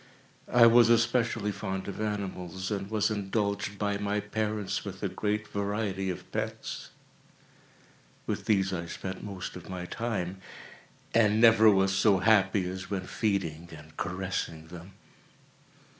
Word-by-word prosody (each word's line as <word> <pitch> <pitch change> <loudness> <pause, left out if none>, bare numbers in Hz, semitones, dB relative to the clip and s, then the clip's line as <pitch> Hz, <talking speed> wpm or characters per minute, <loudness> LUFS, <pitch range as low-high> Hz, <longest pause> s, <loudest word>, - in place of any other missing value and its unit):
I 120 -1 +7
was 115 0 +7
especially 115 -2 +2
fond 95 -2 -4
of 100 +1 -5
animals, 95 -3 -3
and 100 -1 -3
was 110 0 +1
indulged 100 0 -1
by 100 0 -1
my 105 0 0
parents 105 -1 -2
with 95 -1 -7
a - - +2
great 105 +3 -2
variety 100 -1 -2
of 90 - -6
pets. - - -4 1.4
With - - -3
these 95 -3 +2
I 85 -1 -3
spent 95 +2 -6
most 95 -3 -6
of 85 -3 -10
my 90 -1 -5
time, 95 -4 -3 0.8
and 110 -1 +4
never 115 -1 +7
was 95 -1 +3
so 100 -1 +4
happy 100 -2 +3
as 95 +1 -6
when 95 -2 -3
feeding 85 -6 -2
and 75 +1 -15
caressing 90 -3 -3
them. 90 +2 -10
100 Hz, 140 wpm, -29 LUFS, 95-105 Hz, 1.4 s, I